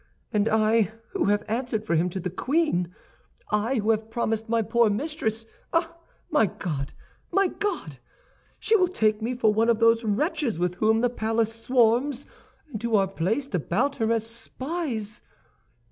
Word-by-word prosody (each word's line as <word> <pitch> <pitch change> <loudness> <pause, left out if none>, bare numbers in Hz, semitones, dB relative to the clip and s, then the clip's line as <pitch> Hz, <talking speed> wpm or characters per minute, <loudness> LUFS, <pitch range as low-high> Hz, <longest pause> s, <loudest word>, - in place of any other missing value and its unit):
And 210 +1 +2
I, 220 0 +3 0.2
who 390 - 0
have 205 0 +2
answered 225 -1 -2
for 190 - 0
him 170 +2 +2
to 190 - -4
the 180 0 -4
queen—I, 210 - -2
who 220 -1 +2
have 220 0 -1
promised 225 -1 -2
my 230 -1 +2
poor 230 +1 +3
mistress—ah, 275 +6 -2 0.4
my 295 -9 +4
God, 150 -6 -4 0.4
my 390 +1 +3
God! 345 - -4 0.6
She 445 - +2
will 370 -4 +4
take 215 -11 +1
me 240 +3 -2
for 220 -3 +3
one 225 +2 +2
of 230 - +4
those 230 +1 +4
wretches 230 - 0
with 175 +1 0
whom 220 +1 +3
the 245 - +3
palace 225 -1 0
swarms 245 +3 +2 0.5
and 215 - -4
who 235 -1 +1
are 195 -2 +4
placed 205 - -2
about 200 - 0
her 225 -2 +1
as 225 -1 +1
spies! 235 -2 -4
225 Hz, 160 wpm, -26 LUFS, 210-255 Hz, 0.6 s, my